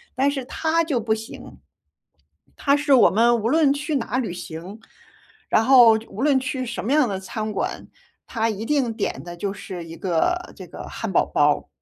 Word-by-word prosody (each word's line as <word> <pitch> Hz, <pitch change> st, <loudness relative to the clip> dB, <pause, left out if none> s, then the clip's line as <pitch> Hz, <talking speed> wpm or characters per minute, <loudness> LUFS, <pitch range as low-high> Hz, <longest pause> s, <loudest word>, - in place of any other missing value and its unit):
但 275 Hz, +2 st, +2 dB
是 270 Hz, -3 st, -4 dB
他 325 Hz, +5 st, 0 dB
就 290 Hz, -7 st, -1 dB
不 220 Hz, 0 st, 0 dB
行。 220 Hz, +1 st, -9 dB, 1.0 s
他 280 Hz, -, +2 dB
是 290 Hz, -1 st, +2 dB
我 250 Hz, -, +7 dB
们 235 Hz, +3 st, +3 dB
无 230 Hz, -, +1 dB
论 300 Hz, -2 st, +4 dB
去 290 Hz, +1 st, -2 dB
哪 245 Hz, 0 st, -3 dB
旅 235 Hz, -8 st, -2 dB
行， 175 Hz, +4 st, -8 dB, 0.7 s
然 225 Hz, -, +3 dB
后 245 Hz, -3 st, +8 dB, 0.2 s
无 200 Hz, -, -8 dB
论 280 Hz, -1 st, +3 dB
去 255 Hz, 0 st, -3 dB
什 235 Hz, -3 st, -5 dB
么 260 Hz, -, +1 dB
样 295 Hz, -6 st, +3 dB
的 195 Hz, -2 st, -3 dB
餐 215 Hz, +3 st, -5 dB
馆， 210 Hz, -, -3 dB, 0.4 s
他 225 Hz, -1 st, -1 dB
一 215 Hz, -1 st, -3 dB
定 265 Hz, -4 st, 0 dB
点 -, -, -3 dB
的 175 Hz, 0 st, -8 dB
就 195 Hz, +3 st, -3 dB
是 190 Hz, -3 st, -8 dB
一 165 Hz, 0 st, -10 dB
个 190 Hz, -, 0 dB, 0.2 s
这 -, -, -10 dB
个 -, -, -10 dB
汉 -, -, -5 dB
堡 -, -, +3 dB
包。 -, -, +1 dB
235 Hz, 210 characters per minute, -22 LUFS, 205-280 Hz, 1.0 s, 后